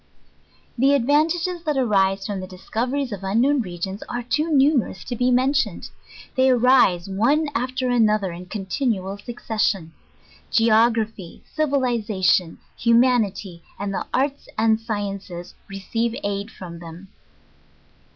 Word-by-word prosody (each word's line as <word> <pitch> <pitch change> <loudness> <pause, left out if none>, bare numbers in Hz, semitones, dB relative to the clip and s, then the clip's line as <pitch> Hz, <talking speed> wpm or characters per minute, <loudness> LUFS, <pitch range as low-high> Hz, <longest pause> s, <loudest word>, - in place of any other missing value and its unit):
The 275 +3 +4
advantages 320 +7 +1
that 300 -4 -1
arise 195 -5 +2
from 205 -2 -3
the 185 - -6
discoveries 245 +8 -3
of 200 -2 -6
unknown 245 +8 +2
regions, 190 0 -5
are 240 0 -3
too 300 +7 -1
numerous 275 - +2
to 245 - -5
be 245 +2 +1
mentioned. 265 +3 +1 0.4
They 260 0 +4
arise 245 -8 +4
one 260 +11 +1
after 255 0 -2
another 215 -5 +2
in 175 +2 -9
continual 200 -1 -2
succession. 205 -6 -2 0.6
Geography, 225 -4 +1
Civiliza 245 - 0
tion, 180 -2 +3 0.2
Humanity, 230 -7 +2 0.2
and 200 0 -3
the - - -3
Arts 275 +2 -1
and 220 0 +3
Sciences, 200 -5 -5 0.2
receive 225 +4 -2
aid 200 +1 -3
from 170 -5 -10
them. 170 +3 -11
225 Hz, 120 wpm, -22 LUFS, 195-260 Hz, 0.6 s, The